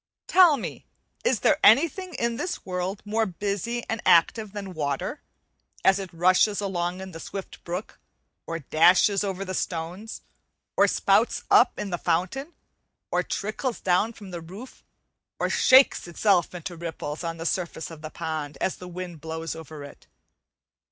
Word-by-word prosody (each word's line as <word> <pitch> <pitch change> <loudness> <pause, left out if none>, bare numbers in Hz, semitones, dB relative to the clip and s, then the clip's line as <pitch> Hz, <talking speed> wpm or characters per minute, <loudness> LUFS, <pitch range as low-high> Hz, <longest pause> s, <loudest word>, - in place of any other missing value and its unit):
Tell 350 -5 +6
me, - - -7 0.4
is 480 - +1
there - - +3
anything 335 +3 +4
in 235 -1 -1
this 355 +5 -4
world 185 +2 -3
more 220 +1 0
busy 205 +5 -3
and 225 0 -2
active 200 +5 +4
than 200 -2 -6
water, 145 -4 -3 0.6
as 190 0 +5
it 190 -3 -6
rushes 185 +4 +3
along 180 -2 -2
in 190 0 -8
the 165 - -9
swift 195 +3 -8
brook, 180 +4 -6 0.5
or 165 - -3
dashes 175 +6 +4
over 195 -1 -3
the 185 - -4
stones, 180 +5 -4 0.5
or - - +5
spouts - - +2
up - - +5
in 205 -2 -4
the 175 - -2
fountain, 185 - -1 0.6
or - - +2
trickles 220 +4 -3
down 190 +5 +2
from 200 -4 -11
the 170 -1 -6
roof, 195 +10 -11 0.5
or - - -1
shakes 260 -7 +5
itself 180 0 +2
into 175 0 -6
ripples 160 -2 -5
on 165 0 -3
the 165 - -6
surface 170 -3 -2
of 160 -2 -10
the 155 - -6
pond 155 -2 -5
as 190 - -1
the 180 - -9
wind 175 -3 -7
blows 160 +1 -5
over 160 -2 -9
it? 140 - -13
185 Hz, 160 wpm, -26 LUFS, 165-210 Hz, 0.6 s, Tell